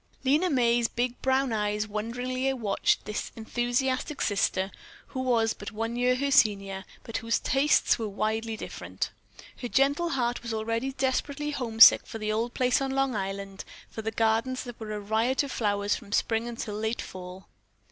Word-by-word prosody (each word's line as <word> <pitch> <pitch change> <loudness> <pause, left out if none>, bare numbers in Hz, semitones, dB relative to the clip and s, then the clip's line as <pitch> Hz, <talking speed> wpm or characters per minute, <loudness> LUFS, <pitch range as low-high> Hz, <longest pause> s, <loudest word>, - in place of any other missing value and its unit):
Lena 300 +7 +3
May's 240 -4 +3
big 245 +1 -2
brown 265 -1 +2
eyes 210 0 0
wonderingly 245 +5 -2
watched 220 -6 0
this 210 - -4
enthusiastic 245 +5 -1
sister, 195 -1 +1 0.4
who 260 - -5
was 235 -3 +2
but 205 - -8
one 225 +2 -3
year 250 +1 +2
her 280 +2 -1
senior, 195 -5 +3 0.2
but 230 - -4
whose 230 0 0
tastes 270 0 +3
were 220 -2 -2
widely 220 +2 -2
different. - - -5 0.5
Her 245 - -2
gentle 280 +7 +2
heart 245 -4 -1
was 235 -2 -4
already 230 +4 -2
desperately 280 +2 -1
homesick 230 -5 +7
for 225 - -6
the 215 -1 -2
old 230 +3 -1
place 250 +1 +2
on 270 - -1
Long 270 -2 0
Island, 195 0 -4 0.3
for 220 - -5
the 220 - -2
gardens 225 +3 +1
that 245 -2 -9
were 220 -1 -6
a 210 - -3
riot 220 +7 +1
of 280 - -5
flowers 205 -2 0
from 205 -3 -9
spring 225 +1 +1
until 230 -3 -5
late 220 +2 -2
fall. 185 0 -9
230 Hz, 170 wpm, -28 LUFS, 215-260 Hz, 0.5 s, homesick